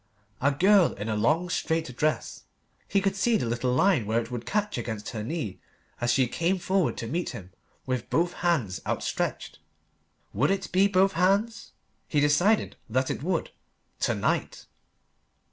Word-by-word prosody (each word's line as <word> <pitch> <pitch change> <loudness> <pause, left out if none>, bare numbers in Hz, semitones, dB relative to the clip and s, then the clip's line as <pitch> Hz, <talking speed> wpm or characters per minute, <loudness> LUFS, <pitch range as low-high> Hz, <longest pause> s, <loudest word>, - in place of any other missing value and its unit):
A 140 +2 +3
girl 190 +4 +4
in 105 +2 -5
a 110 - 0
long 155 +12 +2
straight 160 -6 -2
dress; 155 +3 -1 0.4
he 200 - +2
could 195 0 0
see 225 +3 +2
the - - -2
little 120 +2 -1
line 135 - +3
where 110 +2 +2
it 115 +1 -6
would 120 -1 -5
catch 210 - -1
against 110 -3 -5
her 110 - -5
knee 120 - -4 0.4
as 120 0 +2
she 130 +1 +3
came 170 +8 0
forward 185 -1 0
to 115 - -4
meet 170 +8 -2
him 95 -1 -12 0.3
with 130 -2 -3
both 170 +6 +1
hands 145 - 0
outstretched. - - -2 0.7
Would 135 +9 +2
it 195 0 -1
be 190 +2 +4
both 195 0 +3
hands? 200 +6 +1 0.3
He 150 - +1
decided 160 +9 +2
that 130 +3 0
it - - -4
would 170 +2 -1 0.5
to - - +1
night. - - -1
155 Hz, 165 wpm, -27 LUFS, 120-190 Hz, 0.7 s, girl